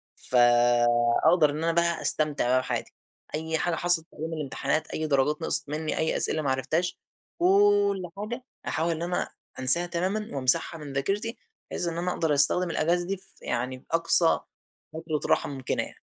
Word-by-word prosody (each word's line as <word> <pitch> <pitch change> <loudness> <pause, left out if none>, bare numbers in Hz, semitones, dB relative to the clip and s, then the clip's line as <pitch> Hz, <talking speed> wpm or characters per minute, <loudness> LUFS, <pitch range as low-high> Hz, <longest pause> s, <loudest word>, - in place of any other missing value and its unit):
فأقدَر 120 +5 +3
إن 150 +2 -4
أنا 165 - +2
بقى 170 -1 +1
أستمتع 150 -3 0
بقى 130 +1 +3
بحياتي، - - -4 0.4
أي 160 +1 -2
حاجة 175 +1 -1
حصلت 175 -2 +1
في - - -22
أيام 160 +2 -5
الامتحانات 145 0 -2
أي 155 0 -3
درجات 145 +2 +1
نقصِت 160 - -2
مني 155 +1 -3
أي 160 - 0
أسئلة 155 - 0
ما 140 -3 0
عرفتهاش، 155 +7 -1 0.4
كل 200 0 +3
حاجة 240 +5 -5 0.2
أحاول 165 +2 0
إن 165 0 -3
أنا 175 +1 -2 0.3
أنساها 150 +7 +6
تمامًا 185 +5 -2
وامسحها 135 +6 +2
من 145 -2 -8
ذاكرتي، 200 - -2 0.3
بحيث 175 - -2
إن 165 - -3
أنا 180 +1 -1
أقدَر 160 -4 0
أستخدم 170 +5 +3
الأجازة 175 +2 0
دي 195 0 -2
ف - - -22
يعني 125 +2 -3
بأقصى 165 +4 +2 0.5
فترة 160 -1 -3
راحة - - +2
ممكنة 135 -2 -2
يعني. - - -11
160 Hz, 170 wpm, -26 LUFS, 140-175 Hz, 0.5 s, أنساها